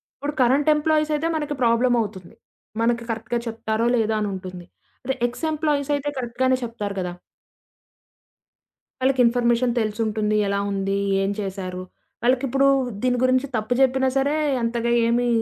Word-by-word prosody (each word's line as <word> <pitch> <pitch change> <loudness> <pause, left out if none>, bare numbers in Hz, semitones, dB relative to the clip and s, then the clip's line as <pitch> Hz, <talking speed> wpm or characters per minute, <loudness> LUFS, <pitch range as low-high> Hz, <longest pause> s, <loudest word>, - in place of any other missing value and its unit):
ఇప్పుడు 290 +2 -4
కరెంట్ 270 +5 +3
ఎంప్లాయీసయితే, 305 0 +1
మనకి 295 -2 -2
ప్రాబ్లమవుతుంది. 230 -6 +1 0.5
మనకి 235 0 +1
కరెక్ట్‌గా 235 +2 -3
చెప్తారో, 225 0 -1
లేదో 220 -2 +1
అని 210 -1 -1
ఉంటుంది. 185 -2 -8 0.4
అదే 265 +1 -1
ఎక్స్ 245 +7 -5
ఎంప్లాయీసయితే 290 -2 0
కరెక్ట్ 240 -1 -5
గానే 260 0 +3
చెప్తారు 210 -4 -4
గదా! 180 -1 -3 1.9
వాళ్ళకి 260 0 +3
ఇన్‌ఫర్మేషన్ 240 +1 +2
తెలిసుంటుంది. 215 0 -1
ఎలా 200 0 0
ఉంది? 195 0 -1 0.2
ఏం 195 - 0
చేశారు? 185 -2 -5 0.4
వాళ్ళకిప్పుడు 260 +2 +2 0.4
దీని 250 -1 +2
గురించి 255 +2 +2
తప్పు 215 +2 0
జెప్పినా 265 0 +3
సరే, 280 +2 +1 0.3
అంతగా 235 0 -1 0.2
ఏమి 240 +1 +1
240 Hz, 130 wpm, -23 LUFS, 215-265 Hz, 1.9 s, కరెంట్